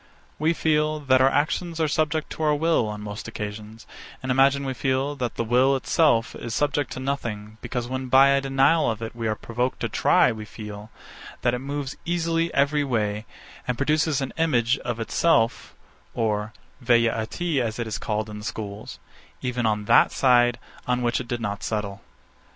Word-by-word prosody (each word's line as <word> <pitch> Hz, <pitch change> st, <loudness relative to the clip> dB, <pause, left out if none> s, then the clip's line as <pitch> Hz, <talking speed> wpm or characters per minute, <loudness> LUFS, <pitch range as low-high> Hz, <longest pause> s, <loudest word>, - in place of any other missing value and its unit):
We 160 Hz, +2 st, +2 dB
feel, 155 Hz, -1 st, +1 dB
that 130 Hz, -3 st, +3 dB
our 135 Hz, -, +6 dB
actions 160 Hz, +4 st, -1 dB
are 160 Hz, -, +2 dB
subject 155 Hz, +1 st, -1 dB
to -, -, -6 dB
our 150 Hz, -1 st, +3 dB
will, 160 Hz, -6 st, +2 dB
on 105 Hz, 0 st, -5 dB
most 105 Hz, +1 st, -6 dB
occasions; 105 Hz, 0 st, -7 dB, 0.4 s
and 130 Hz, -, -1 dB
imagine 135 Hz, +2 st, +3 dB
we 135 Hz, -, -2 dB
feel, 135 Hz, +3 st, -1 dB
that 125 Hz, -3 st, -3 dB
the -, -, -1 dB
will 125 Hz, +4 st, +3 dB
itself 130 Hz, -3 st, +2 dB
is 120 Hz, -1 st, -5 dB
subject 145 Hz, -2 st, 0 dB
to -, -, -6 dB
nothing, 110 Hz, -6 st, -4 dB
because, 120 Hz, -1 st, -4 dB
when 130 Hz, +1 st, -4 dB
by 135 Hz, +2 st, +6 dB
a 140 Hz, 0 st, +3 dB
denial 135 Hz, +4 st, +3 dB
of 115 Hz, 0 st, -3 dB
it 115 Hz, -, -6 dB
we 115 Hz, -1 st, -3 dB
are 110 Hz, -, 0 dB
provoked 120 Hz, +4 st, -3 dB
to -, -, -1 dB
try, -, -, +3 dB
we 110 Hz, -1 st, -6 dB
feel, 105 Hz, 0 st, -9 dB, 0.5 s
that 120 Hz, -, +2 dB
it 125 Hz, -, -1 dB
moves 140 Hz, +1 st, -5 dB
easily 165 Hz, -1 st, 0 dB
every 145 Hz, +1 st, +2 dB
way, 110 Hz, -5 st, -1 dB, 0.4 s
and 125 Hz, -1 st, -1 dB
produces 150 Hz, 0 st, +1 dB
an 135 Hz, -, -4 dB
image 130 Hz, -5 st, +2 dB
of 120 Hz, -1 st, -4 dB
itself 115 Hz, +1 st, +1 dB, 0.4 s
(or 105 Hz, -1 st, -1 dB, 0.3 s
a -, -, -16 dB
Velleïty, 115 Hz, +6 st, +1 dB
as 115 Hz, -3 st, -2 dB
it 120 Hz, -, -2 dB
is 110 Hz, -1 st, -4 dB
called 105 Hz, 0 st, -2 dB
in 105 Hz, 0 st, -8 dB
the -, -, -10 dB
schools) 105 Hz, -1 st, -6 dB, 0.5 s
even 125 Hz, -2 st, 0 dB
on 105 Hz, -1 st, -1 dB
that -, -, +5 dB
side, 120 Hz, -2 st, +4 dB, 0.3 s
on 125 Hz, 0 st, 0 dB
which 120 Hz, 0 st, +1 dB
it 125 Hz, -, -9 dB
did 120 Hz, -, -3 dB
not 100 Hz, -3 st, -4 dB
settle. 105 Hz, -2 st, -3 dB
125 Hz, 190 wpm, -24 LUFS, 110-140 Hz, 0.5 s, our